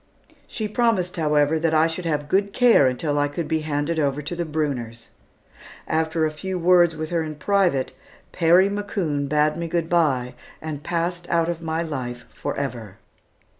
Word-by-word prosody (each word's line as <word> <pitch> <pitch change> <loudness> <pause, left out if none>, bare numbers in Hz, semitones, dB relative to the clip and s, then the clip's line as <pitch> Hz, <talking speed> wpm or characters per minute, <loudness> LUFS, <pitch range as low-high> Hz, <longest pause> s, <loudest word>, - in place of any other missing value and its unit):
She 220 -6 -4
promised, 210 -5 0
however, 150 0 +2
that 160 0 +1
I 155 +1 +5
should 165 +2 -3
have 150 -3 -1
good 200 +5 +1
care 240 - +5
until 145 +3 -1
I 145 - +2
could 155 +3 -4
be 160 - 0
handed 155 +1 -2
over 140 -1 0
to 175 - -4
the 170 0 -2
Brunners. 125 -7 -3 0.8
After 160 0 0
a 155 - -1
few 185 +4 -4
words 175 -1 +4
with 155 +1 -5
her 170 -1 +1
in 155 -1 -5
private 180 -5 +1 0.4
Perry 175 +3 +4
McCoon 190 -8 -2
bade 150 +1 +2
me 170 0 -3
good 165 -1 -2
bye, 135 -8 +1 0.3
and 155 -2 -6
passed 175 +2 -3
out 170 0 +2
of 170 -1 -3
my 165 0 -2
life 125 -6 -5
forever. 125 -8 -5
160 Hz, 170 wpm, -23 LUFS, 145-175 Hz, 0.8 s, I